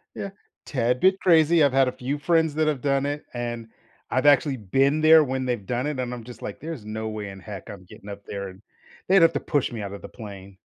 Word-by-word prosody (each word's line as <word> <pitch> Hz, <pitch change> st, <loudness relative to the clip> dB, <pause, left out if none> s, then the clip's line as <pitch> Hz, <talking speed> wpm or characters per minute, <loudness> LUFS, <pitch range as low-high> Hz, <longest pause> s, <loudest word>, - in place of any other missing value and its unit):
Yeah. 200 Hz, -, -5 dB, 0.4 s
Tad 125 Hz, -3 st, 0 dB
bit 190 Hz, +4 st, +3 dB
crazy. 165 Hz, -2 st, +4 dB
I've 140 Hz, -2 st, +3 dB
had 135 Hz, -1 st, +4 dB
a -, -, 0 dB
few 135 Hz, +4 st, -4 dB
friends 160 Hz, +1 st, +2 dB
that 155 Hz, 0 st, +1 dB
have 145 Hz, -5 st, -1 dB
done 140 Hz, -1 st, +1 dB
it, 145 Hz, +1 st, -3 dB
and 120 Hz, -2 st, -4 dB, 0.4 s
I've 130 Hz, -, 0 dB
actually 145 Hz, -1 st, +4 dB
been 135 Hz, +8 st, +1 dB
there 160 Hz, 0 st, +7 dB
when 130 Hz, -1 st, -2 dB
they've 120 Hz, -6 st, -2 dB
done 125 Hz, +3 st, -2 dB
it, 150 Hz, -3 st, -3 dB
and 125 Hz, -1 st, -3 dB
I'm 120 Hz, -2 st, -7 dB
just 120 Hz, -1 st, -12 dB
like, -, -, -6 dB
"There's 155 Hz, -8 st, -7 dB
no 110 Hz, +1 st, -4 dB
way 105 Hz, -2 st, -5 dB
in 95 Hz, 0 st, -10 dB
heck 100 Hz, -1 st, -9 dB
I'm 95 Hz, -2 st, -10 dB
getting 100 Hz, +3 st, -13 dB
up 100 Hz, 0 st, -8 dB
there." 100 Hz, -2 st, -6 dB, 0.5 s
They'd 190 Hz, -1 st, +5 dB
have 165 Hz, 0 st, +5 dB
to -, -, -1 dB
push 145 Hz, -6 st, -1 dB
me 115 Hz, -3 st, -5 dB
out 100 Hz, 0 st, -6 dB
of 100 Hz, -, -8 dB
the -, -, -9 dB
plane. 100 Hz, -3 st, -11 dB
130 Hz, 245 wpm, -24 LUFS, 110-150 Hz, 0.5 s, there